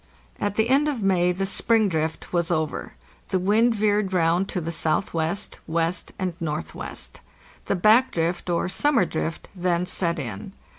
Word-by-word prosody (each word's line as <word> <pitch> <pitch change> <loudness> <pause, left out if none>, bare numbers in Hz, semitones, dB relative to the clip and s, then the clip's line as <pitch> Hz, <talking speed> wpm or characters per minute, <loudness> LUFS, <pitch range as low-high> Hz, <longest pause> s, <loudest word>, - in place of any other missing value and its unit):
At 205 0 -1
the 220 +1 +2
end 280 +3 +4
of 265 -8 -2
May 180 -2 +3
the 190 +2 -2
"spring 220 +2 +3
drift" 160 -2 -3
was 170 0 +1
over. 155 -3 -2 0.4
The 190 - +1
wind 220 +6 +3
veered 210 -2 +1
round 175 +2 +2
to 185 - -2
the 165 -1 -4
S.W., 160 +2 0 0.6
W., 165 0 +1 0.3
and 185 -2 -2
N.W. 155 -2 -4 0.7
The - - 0
back 215 +7 +5
drift 170 +2 -1
or 170 0 +1
"summer 235 +2 +2
drift' 160 0 -4
then 180 -1 0
set 175 -2 0
in. 110 -9 -6
180 Hz, 160 wpm, -24 LUFS, 165-205 Hz, 0.7 s, back